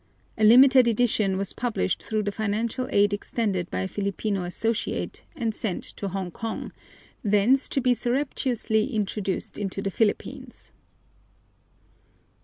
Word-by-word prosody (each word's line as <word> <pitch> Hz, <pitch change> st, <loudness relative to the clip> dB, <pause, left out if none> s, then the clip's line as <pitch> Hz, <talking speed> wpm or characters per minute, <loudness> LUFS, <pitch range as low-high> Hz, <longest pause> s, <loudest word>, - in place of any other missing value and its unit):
A 220 Hz, -, -2 dB
limited 255 Hz, +3 st, +7 dB
edition 215 Hz, -4 st, +2 dB
was 195 Hz, -1 st, -1 dB
published 230 Hz, -7 st, -1 dB
through 215 Hz, -1 st, -1 dB
the 205 Hz, -, -1 dB
financial 220 Hz, +4 st, -2 dB
aid 205 Hz, 0 st, +3 dB
extended 205 Hz, -3 st, -2 dB
by 90 Hz, -, -2 dB
a 95 Hz, -, -2 dB
Filipino 200 Hz, -, -2 dB
associate, 225 Hz, +5 st, -2 dB
and 230 Hz, -6 st, -1 dB
sent 205 Hz, -4 st, -3 dB
to 200 Hz, -, -5 dB
Hongkong, 195 Hz, +4 st, -5 dB, 0.5 s
thence 215 Hz, +6 st, +3 dB
to -, -, +1 dB
be 250 Hz, 0 st, +3 dB
surreptitiously 245 Hz, -2 st, -1 dB
introduced 200 Hz, -2 st, -2 dB
into 195 Hz, -1 st, -3 dB
the 195 Hz, 0 st, -2 dB
Philippines. 215 Hz, +2 st, -2 dB
215 Hz, 125 wpm, -25 LUFS, 195-235 Hz, 0.5 s, limited